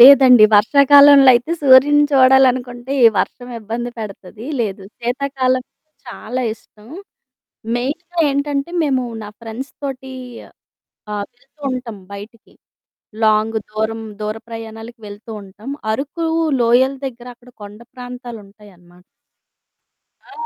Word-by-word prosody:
లేదండి. 255 -3 +8
వర్షాకాలంలో 280 +4 +6
అయితే 245 +8 0
సూర్యుడిని 285 +2 +6
చూడాలనుకుంటే 255 -1 +3
ఈ - - +10
వర్షం 245 +6 -3
ఇబ్బంది 230 +3 -5
పెడతది 210 +2 -9
లేదు. 195 -3 -3 0.2
శీతాకాలం 255 +1 -1 0.5
చాలా 245 +2 -5
ఇష్టం 210 -1 -22 0.9
మెయిన్‌గా 320 +8 -5
ఏంటంటే 280 +1 -2
మేము 265 -4 0 0.2
నా 205 - -8
ఫ్రెండ్స్ 230 +4 -7
తోటి 265 -1 -6 1.0
ఆహ్, 205 -1 -3
వెళ్తూ 275 +4 -30
ఉంటాం 250 -4 -6 0.2
బయటికి 215 +3 -12 0.7
లాంగ్. 215 +1 +2
దూరం 220 +1 -3 0.2
దూర 215 +1 -3
ప్రయాణాలకు 225 +1 -9
వెళ్తూ 205 +3 -12
ఉంటాం 205 +6 -11 0.2
అరకు 290 +8 -4 0.4
లోయల 245 +3 +3
దగ్గర 240 -2 -9
అక్కడ 250 +1 -19
కొండ 205 +2 -11
ప్రాంతాలుంటాయనమాట. 210 -8 -12 1.3
ఆ! - - -15
245 Hz, 105 wpm, -18 LUFS, 220-265 Hz, 1.3 s, ఈ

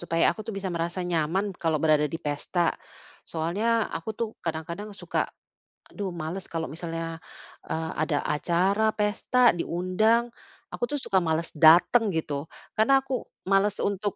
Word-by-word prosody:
supaya 165 -1 +2
aku - - -10
bisa 195 -3 -3
merasa 170 +2 -2
nyaman 175 +4 0
kalau 165 -3 0
berada 150 -1 +4
di 165 - -4
pesta. 165 +3 -1 0.6
Soalnya 210 +8 +1
aku 165 +7 -4
tuh 230 - -1
kadang-kadang 170 +5 -4
suka, - - -2 0.6
aduh 195 -3 -4
malas, 170 +3 -5
kalau 165 -1 -3
misalnya, 165 +1 -5 0.5
eee, 160 0 -3
ada 150 -1 +1
acara 190 +8 +1
pesta 225 +4 +3
diundang, 185 +8 +1 0.4
aku - - -6
tuh 290 +2 -3
suka 195 - +1
malas 165 0 0
datang 175 +9 +6
gitu 150 -2 -2 0.3
karena 270 +5 +5
aku 265 -2 -3 0.3
malas 200 +1 +3
untuk 200 0 -1
175 Hz, 140 wpm, -27 LUFS, 160-210 Hz, 0.6 s, datang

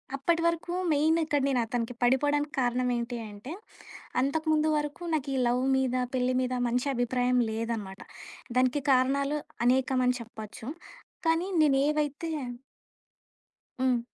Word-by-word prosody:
అప్పటి 330 +5 +1
వరకు 335 +1 0 0.2
మెయినిక్కడ 310 -1 +2
నేను 265 -3 +1
అతనికి 230 +1 -2
పడిపోడానికి 290 +4 +2
కారణం 250 0 +1
ఏంటి 235 0 -3
అంటే 205 +7 -9 0.7
అంతకుముందు 310 +2 +1
వరకు 295 +3 -3
నాకీ 285 -3 -1
లవ్ 245 +2 +1
మీద 255 -1 0 0.2
పెళ్లి 255 0 +1
మీద 255 0 -1
మంచి 245 +3 0
అభిప్రాయం 245 +1 +1
లేదనమాట. 220 -3 -4 0.6
దానికి 255 +3 +2
కారణాలు 275 +3 +2 0.3
అనేకం 260 +1 +3
అని 250 0 +2
చెప్పొచ్చు. 220 0 -9 0.6
కానీ 325 +3 +2
నేనేవైతే 295 +2 +1 1.5
హ్మ్. 255 -2 +3
260 Hz, 115 wpm, -28 LUFS, 245-295 Hz, 1.5 s, అనేకం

